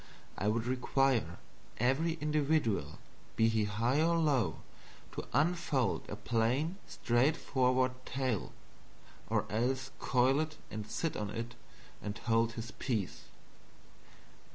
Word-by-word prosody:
I 100 - -2
would 110 +2 +1
require 125 - +1 0.4
every 135 +8 +2
individual, 150 - 0 0.4
be 115 0 +4
he 110 -1 +2
high 115 +8 +1
or 170 +1 +3
low, 135 - +1 0.5
to - - -6
unfold 155 -5 +1
a - - -3
plain 125 - 0
straightforward 130 0 +2
tale, 130 -6 -2 0.8
or - - +1
else 130 +5 0
coil 130 +2 +3
it 155 -1 -2
and 110 0 -5
sit 165 - -1
on 105 -1 -3
it 115 +3 -4 0.5
and 105 0 -4
hold 115 0 +1
his 115 +1 -6
peace. 110 -8 -3
125 Hz, 115 wpm, -33 LUFS, 115-145 Hz, 0.8 s, be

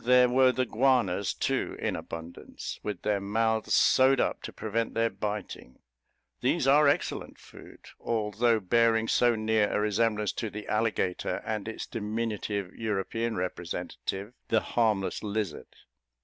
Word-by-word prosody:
There 125 0 +5
were 130 +1 +5
the 130 +1 0
guanas, 115 -6 +2
too, - - -2
in - - -1
abundance, 85 +1 -7
with 105 -4 -5
their 105 -2 +1
mouths 110 +2 +1
sewed 130 0 +5
up - - 0
to - - -7
prevent 115 +1 -3
their 115 0 +2
biting; 100 -9 -5 0.6
these - - +1
are 145 +2 +6
excellent 140 - -1
food, - - -15 0.2
although 110 +1 +1
bearing 115 +2 +2
so 120 0 +3
near 110 -1 +1
a - - +1
resemblance 105 0 +1
to 115 - -4
the 105 0 -8
alligator, 110 -4 -1
and 110 -1 -3
its 110 - -5
diminutive 105 -3 -3
European 110 +2 -2
representative, 90 +3 -4
the 110 - +2
harmless 110 -5 +1
lizard. 105 -3 -3
110 Hz, 135 wpm, -28 LUFS, 105-115 Hz, 0.6 s, are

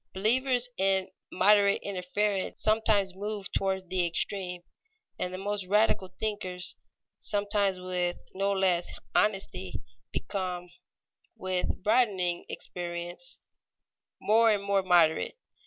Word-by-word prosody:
Believers 245 +5 +2
in 190 -1 +2 0.2
moderate 200 +1 +4
interference 195 +1 -1
sometimes 215 -3 +2
move 205 0 -5
toward 190 -2 -1
the 185 -1 +2
extreme, 180 +1 -2 0.6
and 180 - -1
the 185 - -5
most 200 0 -3
radical 210 -1 +3
thinkers, 185 -3 -4 0.4
sometimes 205 -2 0
with 180 -1 -1 0.2
no 195 +1 0
less 185 -3 +1 0.2
honesty, 195 -3 0 0.3
become, 180 -3 -3 0.7
with 185 0 -2
broadening 200 -7 +2
experience, 175 +7 -6 0.8
more 225 +2 +4
and 205 -2 +2
more 200 -1 +2
moderate. 175 - +3
195 Hz, 105 wpm, -29 LUFS, 180-205 Hz, 0.8 s, moderate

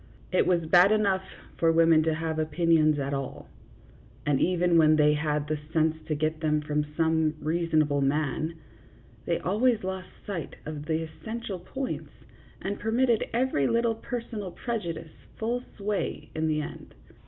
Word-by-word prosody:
It 185 - +3
was 175 -3 +2
bad 180 +4 +6
enough 200 -3 +2 0.3
for 165 -1 +4
women 165 -1 +5
to 160 -1 +2
have 160 0 -2
opinions 155 -1 +3
at 140 0 -2
all, 135 -1 -5 0.8
and 145 -2 +2
even 175 -1 +3
when 155 -1 +6
they 150 -1 +5
had 150 -1 0
the 155 0 -1
sense 160 -1 +2
to 155 - 0
get 155 +1 -1
them 155 -1 +1
from 150 0 -1
some 160 -1 +2
reason 160 0 +2
able 145 -1 0
man, 150 +3 0 0.7
they 170 - +2
always 220 +4 +1
lost 190 -1 -4 0.2
sight 185 -6 -5
of 150 -1 -6
the 160 0 0
essential 210 +5 -6
points, 265 +9 -5 0.5
and 200 +1 -3
permitted 230 +1 +2
every 235 - +1
little 235 0 +2
personal 225 -3 -5
prejudice 170 -7 -4 0.2
full 235 +2 -1 0.2
sway 205 0 -3
in 160 0 -1
the 155 -1 +1
end. - - -9
165 Hz, 155 wpm, -27 LUFS, 155-200 Hz, 0.8 s, bad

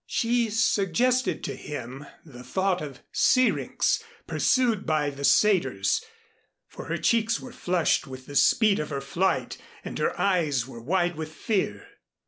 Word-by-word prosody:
She 235 0 +1
suggested 220 +4 +1
to - - -4
him 135 0 -7 0.2
the 125 -6 -12
thought 190 +7 0
of 140 -4 -8
Syrinx 395 - +2 0.2
pursued 240 -6 +1
by 150 -2 0
the 140 0 -9
satyrs; 205 - +3 0.6
for - - -10
her - - -2
cheeks 230 -1 +1
were 250 -2 -10
flushed 175 -6 0
with 130 -1 -9
the 145 - -10
speed 215 - +4
of 150 - -3
her 140 -2 -3
flight 170 +8 -1 0.3
and - - -5
her - - -1
eyes 155 -11 +1
were 120 -3 -10
wide 175 +5 0
with 155 0 -5
fear. 210 - -2
180 Hz, 145 wpm, -26 LUFS, 145-225 Hz, 0.6 s, speed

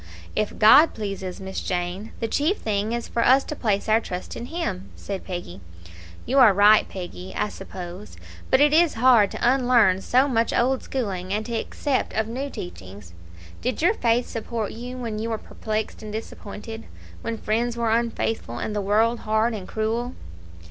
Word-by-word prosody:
"If 215 - -1
God 285 +9 +7
pleases, 195 -3 -5
Miss 190 0 -5
Jane; 180 +4 -3
the 225 - 0
chief 305 - +1
thing 210 0 -1
is 235 0 -3
for 235 - 0
us 265 +3 +5
to 300 - -6
place 210 -7 0
our 220 +1 +4
trust 180 -4 -6
in 240 - -6
Him," 210 - -4
said 195 -2 -6
Peggy. 175 - -6 0.6
"You 265 +3 +2
are 225 -7 +7
right, 210 +2 +6
Peggy, 180 0 -8
I 210 - 0
suppose; 185 0 -9 0.3
but 260 - +4
it 295 +1 +5
is 335 0 +4
hard 230 -4 +5
to - - -1
unlearn 245 -7 +4
so 255 +7 +3
much 230 -4 +1
old 260 +2 +2
schooling 190 -8 -3
and 215 +2 -1
to 235 - -5
accept 260 +4 -1
of 220 0 0
new 260 +5 -4
teachings. 95 - -9 0.5
Did 250 +4 -2
your 365 +6 +5
faith 240 - +1
support 225 -1 -4
you 245 +2 -7
when 230 -4 -4
you 225 +1 -3
were 225 - -1
perplexed 215 0 -4
and 215 -1 -7
disappointed 220 +1 -7 0.4
when 230 0 -3
friends 235 +3 -1
were 230 -1 +1
unfaithful, 225 - -1
and 210 - -3
the 205 - 0
world 220 +4 +2
hard 220 +2 +1
and 200 -4 -6
cruel?" 230 +3 -2
220 Hz, 180 wpm, -24 LUFS, 200-240 Hz, 0.6 s, God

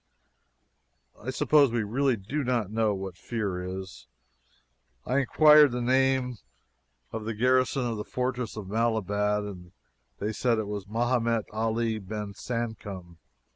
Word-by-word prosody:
I 120 - -5
suppose 140 +1 +4
we 115 -1 0
really 130 +5 +1
do 125 +10 -3
not 120 -6 0
know 110 -2 +1
what 95 -2 -6
fear 100 -6 -3
is. 95 0 -7 1.0
I 130 +2 +1
inquired 150 +2 +6
the 125 - -1
name 130 -1 +1 0.7
of 110 -1 -4
the 110 0 -3
garrison 130 +3 +2
of 115 -2 -2
the 105 - -3
fortress 125 -2 -3
of 105 - -5
Malabat, 105 -1 0
and 90 -3 -9 0.4
they 105 +2 -2
said 120 +1 +1
it 110 - -1
was 100 -2 -5
Mehemet 115 0 +1
Ali 110 +1 -1
Ben 105 +1 -6
Sancom. 105 -7 -5
115 Hz, 135 wpm, -28 LUFS, 105-125 Hz, 1.0 s, inquired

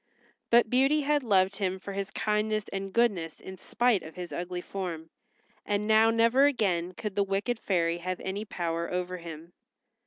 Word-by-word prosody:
But 235 0 +5
Beauty 270 +4 +3
had 295 +1 +1
loved 195 -5 +2
him 190 -2 -1
for 195 +1 -8
his 195 0 -3
kindness 215 0 0
and 195 0 -4
goodness 190 -8 +1
in 190 - -9
spite 240 +2 +1
of 160 - -11
his 180 -1 -7
ugly 180 0 -4
form, 170 -4 -6 0.5
and 205 0 -1
now 220 +1 +5
never 230 +4 +4
again 185 -10 0
could 210 -1 -5
the 205 - +2
wicked 200 +4 -1
fairy 170 -4 0
have 185 +1 -4
any 195 +2 -3
power 170 -4 -3
over 180 0 -2
him. 165 0 -10
195 Hz, 175 wpm, -28 LUFS, 180-220 Hz, 0.5 s, But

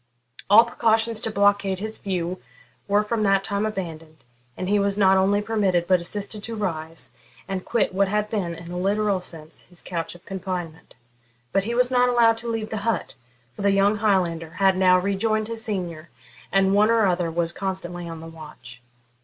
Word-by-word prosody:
All 220 +3 +8
precautions 225 -1 +1
to - - -1
blockade 200 -2 +2
his 215 +3 -5
view 180 -2 -3 0.5
were 205 +1 +3
from 220 +1 -2
that 195 -1 +3
time 200 +1 -1
abandoned, 165 -7 -7 0.3
and 185 - -3
he 205 +1 +2
was 200 0 +1
not 190 -2 +5
only 200 +2 +2
permitted 195 -6 +1
but 185 0 +3
assisted 205 +4 -5
to 230 0 -5
rise, 165 -6 -4 0.4
and 190 -1 -3
quit 235 -5 0
what 195 +1 +2
had 210 +2 0
been, 195 -6 -2
in 170 +1 -10
a 180 - -4
literal 200 0 +1
sense, 160 -3 -10
his 180 - -10
couch 170 -1 -4
of 175 - -17
confinement. 180 -4 -6 0.6
But 195 0 +1
he 235 +2 -2
was 250 +1 +2
not 250 -1 +4
allowed 230 -2 +4
to 235 - -7
leave 225 -1 -3
the 220 - -2
hut; 220 0 -2 0.4
for - - -8
the 200 0 +3
young 200 +2 +3
Highlander 175 -6 0
had 195 -1 +4
now 185 -1 +5
rejoined 210 +3 0
his 225 -1 -5
senior, 175 -7 -4 0.4
and 195 0 +3
one 210 +2 +4
or 230 -2 +4
other 175 -2 +1
was 170 0 0
constantly 175 -3 -4
on 165 -1 -7
the 165 - -9
watch. 150 -6 -12
195 Hz, 190 wpm, -24 LUFS, 175-215 Hz, 0.6 s, All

